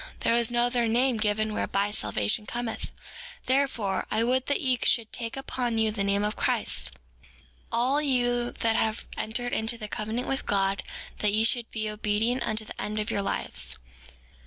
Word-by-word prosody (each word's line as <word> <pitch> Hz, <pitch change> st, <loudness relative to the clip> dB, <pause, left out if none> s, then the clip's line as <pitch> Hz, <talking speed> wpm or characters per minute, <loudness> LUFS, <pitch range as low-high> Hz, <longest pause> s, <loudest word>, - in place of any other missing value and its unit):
There 230 Hz, -, +3 dB
is 235 Hz, -1 st, +4 dB
no 240 Hz, 0 st, +2 dB
other 245 Hz, -1 st, +1 dB
name 245 Hz, +2 st, +3 dB
given 215 Hz, 0 st, +1 dB
whereby 200 Hz, 0 st, 0 dB
salvation 105 Hz, -, +1 dB
cometh; 240 Hz, -1 st, -3 dB, 0.6 s
therefore, 255 Hz, -8 st, +1 dB
I 220 Hz, +1 st, +1 dB
would 255 Hz, +2 st, +1 dB
that 285 Hz, -, +2 dB
ye 255 Hz, -2 st, +1 dB
should 230 Hz, -2 st, +2 dB
take 230 Hz, +1 st, -4 dB
upon 245 Hz, -3 st, -1 dB
you 220 Hz, -1 st, +2 dB
the 205 Hz, -2 st, -1 dB
name 200 Hz, +1 st, +2 dB
of 210 Hz, +1 st, -1 dB
Christ, -, -, 0 dB, 0.8 s
all 250 Hz, +5 st, +3 dB
you 245 Hz, -3 st, +2 dB
that 225 Hz, -1 st, 0 dB
have 220 Hz, -1 st, 0 dB
entered 245 Hz, +3 st, -2 dB
into 225 Hz, +2 st, +1 dB
the 215 Hz, -2 st, -6 dB
covenant 220 Hz, +4 st, -3 dB
with 270 Hz, -, -1 dB
God 195 Hz, 0 st, +1 dB, 0.4 s
that 210 Hz, -1 st, +2 dB
ye 215 Hz, +1 st, +4 dB
should 235 Hz, 0 st, +2 dB
be 215 Hz, -1 st, -3 dB
obedient 215 Hz, +3 st, 0 dB
unto 215 Hz, 0 st, 0 dB
the -, -, -7 dB
end 210 Hz, +1 st, -3 dB
of 210 Hz, -, -1 dB
your 200 Hz, -, +1 dB
lives. 195 Hz, -, -2 dB
225 Hz, 180 wpm, -27 LUFS, 210-245 Hz, 0.8 s, is